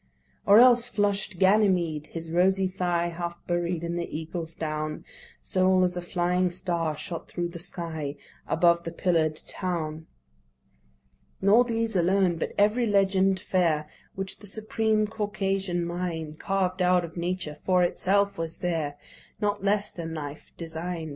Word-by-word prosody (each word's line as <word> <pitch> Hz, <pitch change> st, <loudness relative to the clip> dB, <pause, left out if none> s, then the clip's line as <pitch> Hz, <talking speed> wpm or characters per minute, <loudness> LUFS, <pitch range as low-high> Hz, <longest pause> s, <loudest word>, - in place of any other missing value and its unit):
Or 205 Hz, +1 st, +8 dB
else 245 Hz, 0 st, +7 dB
flush'd 205 Hz, -4 st, 0 dB
Ganymede, 185 Hz, -6 st, +3 dB
his 165 Hz, -1 st, -6 dB
rosy 190 Hz, +2 st, +3 dB
thigh 175 Hz, -2 st, 0 dB
Half 170 Hz, 0 st, -6 dB
buried 175 Hz, -1 st, -1 dB
in 170 Hz, 0 st, -2 dB
the 170 Hz, -, -3 dB
Eagle's 165 Hz, 0 st, -6 dB
down, 155 Hz, -1 st, -4 dB, 0.4 s
Sole 185 Hz, 0 st, +3 dB
as 180 Hz, 0 st, +1 dB
a 175 Hz, -, -2 dB
flying 180 Hz, +1 st, +1 dB
star 170 Hz, -3 st, -2 dB
shot 170 Hz, -2 st, -6 dB
thro' 175 Hz, -, -3 dB
the 170 Hz, 0 st, -8 dB
sky 160 Hz, -4 st, -4 dB, 0.3 s
Above 170 Hz, +1 st, +3 dB
the 165 Hz, -, -5 dB
pillar'd 165 Hz, -3 st, +1 dB
town. 160 Hz, -4 st, -3 dB, 1.3 s
Nor 210 Hz, +6 st, +5 dB
these 230 Hz, -2 st, -1 dB
alone: 180 Hz, 0 st, +3 dB
but -, -, -3 dB
every 215 Hz, +4 st, +3 dB
legend 195 Hz, -2 st, +3 dB
fair 165 Hz, -6 st, +1 dB, 0.3 s
Which 195 Hz, 0 st, -3 dB
the 205 Hz, -, -10 dB
supreme 215 Hz, +1 st, 0 dB
Caucasian 195 Hz, -4 st, -1 dB
mind 170 Hz, -3 st, -4 dB
Carved 190 Hz, -1 st, -1 dB
out 180 Hz, -1 st, +3 dB
of 165 Hz, -, -12 dB
Nature 175 Hz, -3 st, -3 dB
for 180 Hz, -1 st, +3 dB
itself 200 Hz, +2 st, +1 dB
was 165 Hz, 0 st, -4 dB
there' 160 Hz, -5 st, -2 dB, 0.4 s
Not 205 Hz, -1 st, -1 dB
less 205 Hz, +1 st, +1 dB
than 165 Hz, -2 st, -6 dB
life 145 Hz, -1 st, -7 dB
design'd. 165 Hz, 0 st, -4 dB
180 Hz, 145 wpm, -27 LUFS, 165-195 Hz, 1.3 s, Or